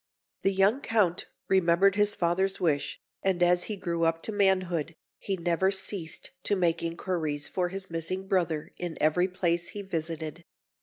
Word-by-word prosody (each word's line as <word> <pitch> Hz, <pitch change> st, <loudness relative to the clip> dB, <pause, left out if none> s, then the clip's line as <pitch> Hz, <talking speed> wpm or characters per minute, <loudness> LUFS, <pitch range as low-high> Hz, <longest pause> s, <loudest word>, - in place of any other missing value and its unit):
The 195 Hz, -, +3 dB
young 195 Hz, +7 st, +3 dB
Count 205 Hz, -9 st, +1 dB, 0.2 s
remembered 190 Hz, +1 st, +4 dB
his 205 Hz, 0 st, +3 dB
father's 190 Hz, +3 st, +1 dB
wish, 145 Hz, -5 st, 0 dB, 0.2 s
and 185 Hz, -2 st, +2 dB
as 175 Hz, 0 st, +3 dB
he 215 Hz, -, -3 dB
grew 170 Hz, -3 st, -2 dB
up 165 Hz, 0 st, +1 dB
to -, -, -3 dB
manhood, 185 Hz, -5 st, +1 dB, 0.2 s
he 195 Hz, -1 st, -2 dB
never 175 Hz, +2 st, +1 dB
ceased 190 Hz, -3 st, -4 dB
to 205 Hz, -, +2 dB
make 170 Hz, -3 st, +1 dB
inquiries 165 Hz, -3 st, -2 dB
for 180 Hz, -1 st, -1 dB
his 190 Hz, -1 st, -7 dB
missing 185 Hz, +4 st, -3 dB
brother 165 Hz, -5 st, 0 dB
in 175 Hz, -2 st, -4 dB
every 155 Hz, +4 st, +3 dB
place 175 Hz, -2 st, 0 dB
he 205 Hz, -, -6 dB
visited. 165 Hz, -2 st, -4 dB
175 Hz, 160 wpm, -28 LUFS, 165-190 Hz, 0.2 s, remembered